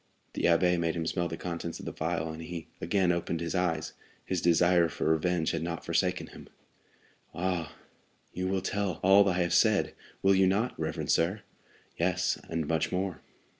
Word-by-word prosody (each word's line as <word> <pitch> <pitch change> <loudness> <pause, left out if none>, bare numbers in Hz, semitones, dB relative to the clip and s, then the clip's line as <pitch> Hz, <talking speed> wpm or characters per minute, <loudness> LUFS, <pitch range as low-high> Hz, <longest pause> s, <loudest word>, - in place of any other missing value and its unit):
The - - -1
abbé 90 +1 +4
made 85 0 0
him 85 -1 -2
smell 85 +1 -1
the 80 0 -5
contents 85 -1 -5
of - - -9
the - - -5
phial, 80 0 -2
and 80 - -8
he 85 0 -6 0.2
again 90 0 +2
opened 85 -1 -2
his 85 0 -3
eyes. 85 -4 -1 0.3
His 90 -3 -1
desire 85 0 +4
for - - -4
revenge 80 +1 +1
had - - -2
not 85 0 -4
forsaken - - 0
him. - - -12 0.9
"Ah, 90 -2 -2 0.6
you 90 +1 -2
will 95 -1 -1
tell 100 -2 -1
all 100 +1 +6
I 90 0 +1
have 85 - -1
said, - - +3 0.3
will 95 0 +5
you 95 0 +4
not, 105 +6 +1
reverend 80 0 -2
sir?" 90 +6 +1 0.6
"Yes, 90 +1 +1
and 80 -2 -2
much 80 0 0
more." 90 -1 -2
85 Hz, 180 wpm, -29 LUFS, 80-95 Hz, 0.9 s, all